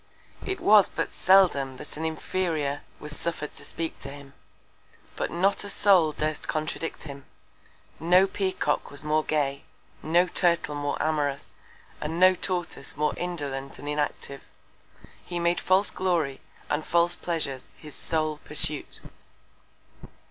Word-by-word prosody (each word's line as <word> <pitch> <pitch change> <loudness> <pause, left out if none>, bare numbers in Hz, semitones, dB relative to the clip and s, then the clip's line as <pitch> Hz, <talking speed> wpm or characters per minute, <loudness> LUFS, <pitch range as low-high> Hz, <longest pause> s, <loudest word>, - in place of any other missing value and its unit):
It 385 - -3
was 210 -2 +6
but - - -3
seldom 175 -9 +4
that 145 - -8
an 160 +2 -4
Inferior 160 -3 -1 0.2
was 150 0 -6
suffer'd 160 -3 -4
to - - -8
speak 165 -1 -4
to - - -8
him; 140 -1 -11 0.8
but - - -2
not 190 +5 +1
a 205 - -6
Soul 190 -6 +4
durst 155 0 -2
contradict 155 +1 -3
him: 140 -2 -9 0.7
No 180 +4 +5
Peacock 190 -1 -1
was 145 +1 -3
more 155 +1 +2
gay; 140 -3 -1 0.4
no 170 +3 +3
Turtle 170 -4 +2
more 145 0 -2
amorous; 145 -3 -1 0.5
and 160 +3 -3
no 185 +1 +7
Tortoise 175 -7 -4
more 150 0 +1
indolent 140 -6 -4
and 145 - -9
inactive. 145 -2 -2 0.8
He 175 - -5
made 170 0 +1
false 190 +2 +4
Glory 165 -7 0 0.3
and 150 +1 -1
false 170 +2 +2
Pleasures 155 -8 -4
his 150 -2 -11
sole 155 -2 -1
Pursuit. 150 0 -2
155 Hz, 135 wpm, -27 LUFS, 145-175 Hz, 0.8 s, no